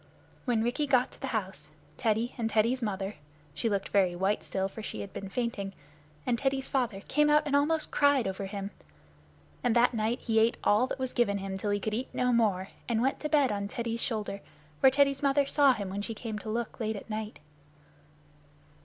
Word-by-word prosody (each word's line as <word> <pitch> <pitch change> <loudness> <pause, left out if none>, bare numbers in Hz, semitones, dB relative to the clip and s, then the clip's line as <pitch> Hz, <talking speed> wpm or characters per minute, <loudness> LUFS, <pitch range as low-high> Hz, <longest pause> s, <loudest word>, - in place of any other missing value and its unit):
When 235 -4 +2
Rikki 255 +6 0
got 255 -1 +3
to - - -17
the 270 - -2
house, 190 - -3 0.3
Teddy 225 +2 0
and 225 -2 -1
Teddy's 230 +4 +2
mother 200 -2 -3 0.4
(she 230 - -1
looked 200 -2 -1
very 185 -3 +3
white 195 +4 0
still, 190 0 -1
for 210 +3 -9
she 110 - -5
had 100 - -8
been 195 - -6
fainting) 205 -4 -2 0.5
and 235 -2 +1
Teddy's 270 -1 0
father 240 -7 -1
came 300 +7 +2
out 300 +1 +5
and 285 -1 +1
almost 305 +2 +2
cried 285 -6 +3
over 190 +1 -3
him; 200 0 -5 0.9
and 240 -1 +2
that 240 +1 +4
night 225 +1 0
he 225 -1 +2
ate 225 +1 +3
all 215 +5 +4
that - - -4
was 260 -1 -3
given 215 -5 +2
him 195 -1 -4
till 200 +2 -3
he 205 0 +1
could 215 +1 -3
eat 245 +4 -2
no 250 0 +2
more, 200 -5 +2 0.2
and 230 0 +1
went 270 - +1
to 300 - -3
bed 285 -6 +4
on 200 -1 -2
Teddy's 230 +1 -3
shoulder, 210 -4 -2 0.4
where 265 - +7
Teddy's 275 0 +2
mother 280 0 +3
saw 280 0 +5
him 200 -6 -3
when 200 +1 -3
she 225 +2 -4
came 215 -1 -5
to 215 - -7
look 230 +1 -3
late 220 -1 -1
at 200 - -8
night. 215 0 -4
225 Hz, 210 wpm, -29 LUFS, 200-260 Hz, 0.9 s, where